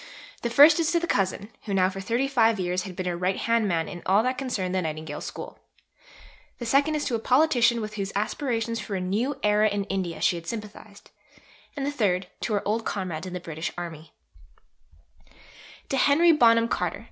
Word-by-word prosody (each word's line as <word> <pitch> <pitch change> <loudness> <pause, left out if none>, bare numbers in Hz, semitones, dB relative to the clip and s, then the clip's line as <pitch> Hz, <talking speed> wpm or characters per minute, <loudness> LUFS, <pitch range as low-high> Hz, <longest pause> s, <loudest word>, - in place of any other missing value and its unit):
The 235 - -1
first 295 +6 +7
is 330 0 +1
to 340 - +3
the 345 - -2
cousin 195 - -1 0.2
who 200 -3 -2
now 185 -1 +4
for 195 +1 -5
thirty 235 +7 0
five 230 -5 +3
years 180 0 -1
had 185 -1 -8
been 185 0 -4
her 180 -1 -1
right 185 +2 -1
hand 230 -2 +1
man 165 -3 0
in 175 -2 -8
all 200 +3 +4
that 255 +1 0
concerned 230 -9 -3
the 190 - +1
Nightingale 155 -2 -5
School; - - -8 1.0
the 240 - -6
second 280 +6 +2
is 300 - -2
to - - -2
a 230 - +1
politician 245 -2 +3
with 215 0 -5
whose 195 -1 -3
aspirations 230 +1 -1
for 210 -1 -5
a - - -1
new 210 +10 -1
era 210 +1 +4
in 205 0 -2
India 175 -4 -3
she 175 +2 +2
had 165 0 -10
sympathized; 210 -1 -8 0.7
and 275 - -2
the 285 - -1
third, 195 -9 0
to 220 - -2
her 205 - -1
old 225 +2 0
comrades 185 -5 -4
in 180 - -7
the 180 - -3
British 160 -1 -5
Army: 165 -3 -7 1.8
(_To 270 - 0
Henry 320 +6 +5
Bonham 230 -6 +5
Carter. - - -2
210 Hz, 205 wpm, -26 LUFS, 185-245 Hz, 1.8 s, first